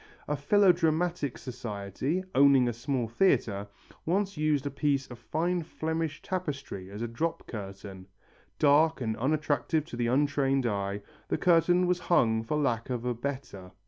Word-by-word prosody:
A 150 - 0
philodramatic 170 -2 +2
society, 125 - -4
owning 135 -2 +5
a 120 - 0
small 125 +1 -2
theatre, 110 - +1 0.4
once 195 +4 0
used 150 -2 +1
a 140 - -2
piece 140 -1 0
of 125 -3 -11
fine 170 +9 -1
Flemish 160 -1 -3
tapestry 145 - -4
as 105 +3 -6
a - - -1
drop 160 +9 -3
curtain. 95 -3 -8 0.5
Dark 155 +2 +4
and 110 -3 -2
unattractive 150 +3 0
to 155 - -8
the 120 0 0
untrained 135 0 +2
eye, 100 -2 -2 0.2
the - - 0
curtain 175 +1 +4
was 180 0 +1
hung 115 -11 +2
for 150 +7 -1
lack 120 -6 0
of 125 -1 -3
a 125 - 0
better. 120 -7 -6
140 Hz, 150 wpm, -29 LUFS, 115-160 Hz, 0.5 s, owning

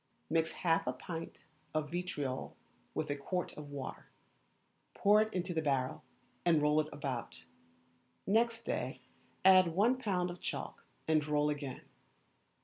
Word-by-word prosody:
Mix 165 0 +2
half 165 -5 +1
a 125 - +1
pint 165 +6 -7 0.3
of 155 -1 -1
vitriol 150 -7 -3 0.4
with 150 -2 -1
a - - 0
quart 180 +6 -3
of 150 -1 -8
water, 140 -2 -6 0.9
pour 210 +1 +6
it 220 0 0
into 180 -2 -2
the 160 - +1
barrel, 135 -5 0 0.4
and 170 -3 +5
roll 150 +1 +4
it 155 - -6
about; 125 - -5 0.8
next 230 +3 +2
day - - -2 0.4
add 185 -1 +8
one 235 +7 +4
pound 180 -7 0
of 175 - -10
chalk, - - -4 0.2
and 155 -2 +3
roll 150 0 +2
again. 145 -3 -5
160 Hz, 140 wpm, -34 LUFS, 145-185 Hz, 0.9 s, add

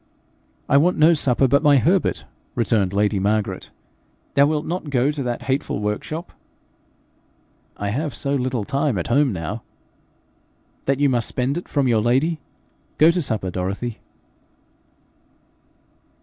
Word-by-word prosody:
'I 140 - +4
want 175 +5 +3
no 155 +2 +6
supper 135 -3 +2
but 140 +2 +3
my 145 -2 +5
Herbert,' 175 +8 +1 0.3
returned 105 -5 +1
lady 100 0 +1
Margaret. 100 -1 -1 0.6
'Thou 140 +1 +5
wilt 155 0 -1
not 170 -3 -4
go 135 +1 +2
to 150 -2 -5
that 120 -2 -3
hateful 135 +1 -1
workshop?' 105 - -4 1.5
'I 100 - -3
have 140 +4 -2
so 140 +4 -1
little 130 -4 -1
time 140 0 -1
at 85 - -3
home 140 +2 +3
now 95 +4 -4 0.6
' - - -40
'That 135 0 +1
you 145 - +5
must 120 -3 0
spend 130 +2 -1
it 175 - -5
from 140 -3 +1
your 115 -3 +3
lady? 135 +8 +1 0.6
Go 160 +2 +6
to 175 +1 -1
supper, 110 - -2
Dorothy.' 95 +6 -4
130 Hz, 145 wpm, -22 LUFS, 110-145 Hz, 1.5 s, no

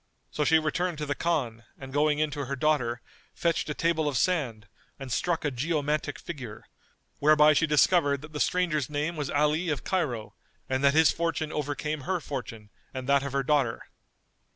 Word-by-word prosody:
So 150 - -1
she 160 +2 +5
returned 160 +2 -1
to 150 - -3
the 145 - -1
Khan 135 -9 -1 0.2
and 130 -1 -10
going 150 +1 +2
in 155 0 0
to 145 -1 -4
her 140 +2 -3
daughter, 125 -5 0 0.3
fetched 170 -2 0
a 150 - -2
table 165 -2 +1
of 140 -3 0
sand, 125 - 0 0.3
and 135 -2 -8
struck 165 +5 0
a 145 - +1
geomantic 150 +2 -1
figure, 125 -10 -8 0.6
whereby 150 +1 +6
she 165 +2 +2
discovered 150 -2 +3
that 155 0 -11
the 150 - -4
stranger's 165 -7 +1
name 150 +3 -2
was 150 -3 -3
Ali 150 +4 +1
of 145 -4 -2
Cairo 125 - -2 0.3
and 130 +1 -1
that 140 +1 +4
his 160 0 +6
fortune 165 -2 -2
overcame 145 +1 -3
her 185 +7 -1
fortune 115 -8 -7 0.2
and 130 0 -5
that 140 0 +4
of 140 -1 -5
her 140 0 +1
daughter. 135 -5 +1
150 Hz, 185 wpm, -27 LUFS, 135-155 Hz, 0.6 s, whereby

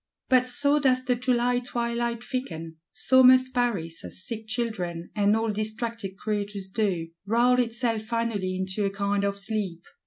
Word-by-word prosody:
But 255 -1 +4
so 285 +4 +2
does 255 -2 +2
the 250 - +3
July 245 0 +1
twilight 235 -1 -2
thicken; 165 -12 -5
so 260 +4 +4
must 255 0 +6
Paris, 200 -10 -1
as 185 - -6
sick 225 -2 -5
children, 190 -8 -3
and 205 0 +3
all 225 0 0
distracted 215 -1 -4
creatures 205 -2 -3
do, 190 -6 -1 0.2
brawl 245 +3 +4
itself 230 -2 0
finally 220 -4 -2
into 190 +2 -2
a 200 - +2
kind 200 0 -1
of 200 0 0
sleep. 200 -4 -3
220 Hz, 155 wpm, -26 LUFS, 200-245 Hz, 0.2 s, must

